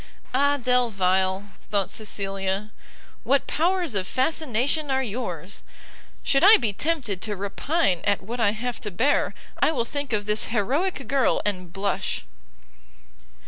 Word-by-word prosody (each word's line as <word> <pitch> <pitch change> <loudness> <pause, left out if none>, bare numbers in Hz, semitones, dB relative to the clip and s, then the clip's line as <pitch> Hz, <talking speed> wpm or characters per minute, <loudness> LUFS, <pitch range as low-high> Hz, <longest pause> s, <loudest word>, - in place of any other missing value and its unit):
Ah 285 +2 +3
Delvile! 195 -6 +2
thought 200 -2 -1
Cecilia, 195 -1 -1 0.5
what 275 0 +2
powers 345 -2 0
of 190 -2 -1
fascination 285 +1 0
are 265 0 +1
yours! 205 -6 -4 0.6
should 275 +3 +3
I 420 +4 +10
be 220 -5 -1
tempted 240 - -1
to 210 0 -3
repine 200 - 0
at 205 -1 +1
what 235 +5 -5
I 225 -3 +4
have 240 +2 -4
to 210 - -3
bear, 255 +10 +1 0.3
I - - +5
will 245 -7 -1
think 285 +1 -4
of 210 -2 0
this 210 +1 +2
heroick 270 - -1
girl 270 -3 +2
and 185 -4 -2
blush! 195 +2 -2
225 Hz, 140 wpm, -25 LUFS, 200-275 Hz, 0.6 s, I